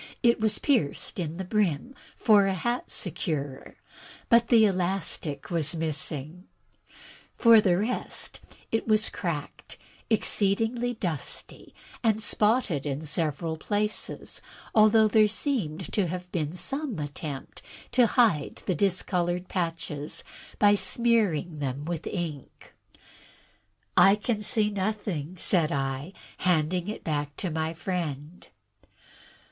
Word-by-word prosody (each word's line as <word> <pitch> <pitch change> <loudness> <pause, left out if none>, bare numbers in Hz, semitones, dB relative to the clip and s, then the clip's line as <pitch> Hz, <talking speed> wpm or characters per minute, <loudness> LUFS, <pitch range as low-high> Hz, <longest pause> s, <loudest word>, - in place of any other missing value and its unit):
It 235 0 +4
was 215 -1 +2
pierced 240 - 0
in 165 -1 -3
the 190 - -3
brim 210 - 0 0.2
for 205 -3 +4
a 195 - 0
hat 240 +8 -2
securer, 145 -6 -3 0.5
but 235 0 +5
the 225 -3 +6
elastic 180 -6 -1
was 165 -1 +1
missing. 160 +1 -2 0.9
For 230 -2 +7
the 180 -4 +2
rest, 220 +6 -3 0.3
it 225 - -1
was 215 -1 +4
cracked, 160 -6 -5 0.3
exceedingly 225 +3 +2
dusty, 170 -8 -4 0.3
and 220 -2 +2
spotted 210 - +1
in 140 +2 -3
several 160 +1 -1
places, 210 +5 -2 0.3
although 215 0 +6
there 215 0 +5
seemed 205 - -2
to 200 -4 +2
have 180 +1 -6
been 155 -3 -2
some 275 - -3
attempt 145 -1 -6 0.3
to 245 -1 +5
hide 220 - +1
the 185 - +1
discolored 180 0 0
patches 165 -4 -3 0.3
by 205 -1 +5
smearing 190 -5 +2
them 140 0 -3
with 170 -1 -4
ink. 160 -7 -6 1.2
"I 195 +1 +7
can 210 +1 -2
see 210 -1 +1
nothing," 190 -5 -3
said 165 -2 +2
I, 135 +5 -3 0.3
handing 180 +1 +1
it 215 - -5
back 145 -2 -2
to 185 - -3
my 160 +1 -2
friend. 160 -3 -5
180 Hz, 120 wpm, -27 LUFS, 155-215 Hz, 1.2 s, For